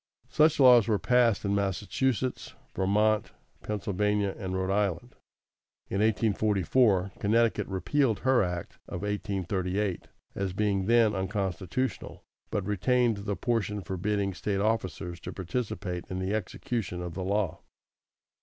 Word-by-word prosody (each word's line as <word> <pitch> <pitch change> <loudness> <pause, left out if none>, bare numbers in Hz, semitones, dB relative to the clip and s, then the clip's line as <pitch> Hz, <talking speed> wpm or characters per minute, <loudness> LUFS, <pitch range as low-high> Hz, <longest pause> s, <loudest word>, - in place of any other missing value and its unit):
Such 155 0 +3
laws 125 -4 +7
were 110 -2 +2
passed 120 -2 +2
in 100 - +1
Massachusetts, 105 +6 -1 0.2
Vermont, 105 +3 +1 0.3
Pennsylvania, 105 -1 -1
and 95 -4 -4
Rhode 95 +1 0
Island. 100 +3 -1 0.8
In 100 - 0
1844, 105 -1 +2
Connecticut 110 -1 +2
repealed 110 +5 0
her 130 -1 +4
act 90 -3 -4
of 90 - -6
1838, 100 -1 -2 0.3
as 95 -2 -3
being 100 -1 0
then 115 -2 +4
unconstitutional, 95 +4 -3 0.3
but 100 - -2
retained 115 +3 +2
the 100 0 -3
portion 105 -1 -1
forbidding 100 +2 -1
State 100 +1 -2
officers 95 -5 -1
to - - -7
participate 95 -3 -4
in 95 - -4
the 95 +2 -2
execution 105 -2 -3
of 90 -1 -5
the 95 - -4
law. 100 -2 -1
100 Hz, 125 wpm, -28 LUFS, 95-110 Hz, 0.8 s, laws